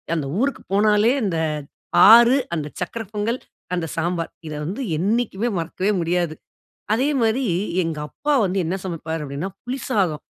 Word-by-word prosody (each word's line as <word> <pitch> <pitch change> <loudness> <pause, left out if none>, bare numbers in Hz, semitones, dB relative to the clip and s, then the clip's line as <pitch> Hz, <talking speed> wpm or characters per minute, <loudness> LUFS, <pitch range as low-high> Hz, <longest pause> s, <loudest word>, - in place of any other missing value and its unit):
அந்த 150 -4 -2
ஊருக்கு 280 +1 0
போனாலே 210 +2 +4
அந்த 180 -6 0 0.7
ஆறு, 235 +3 +8 0.2
அந்த 150 -3 -3
சர்க்கர 225 +6 -3
பொங்கல், 220 +4 -1 0.4
அந்த 175 -2 -2
சாம்பார் 170 0 -1 0.2
இத - - -5
வந்து 195 - -4 0.2
என்னைக்குமே 220 +3 0
மறக்கவே 185 +5 -1
முடியாது. 170 -1 0 0.6
அதே 260 +6 +2
மாரி 230 +4 +2 0.4
எங்கப்பா 160 - -2
வந்து 190 +1 -1
என்ன 175 +4 -1
சமைப்பார் 165 -2 -4
அப்படினா 145 +6 -4 0.2
புளி 250 +2 -3
சாதம். 185 - 0
190 Hz, 140 wpm, -22 LUFS, 165-230 Hz, 0.7 s, ஆறு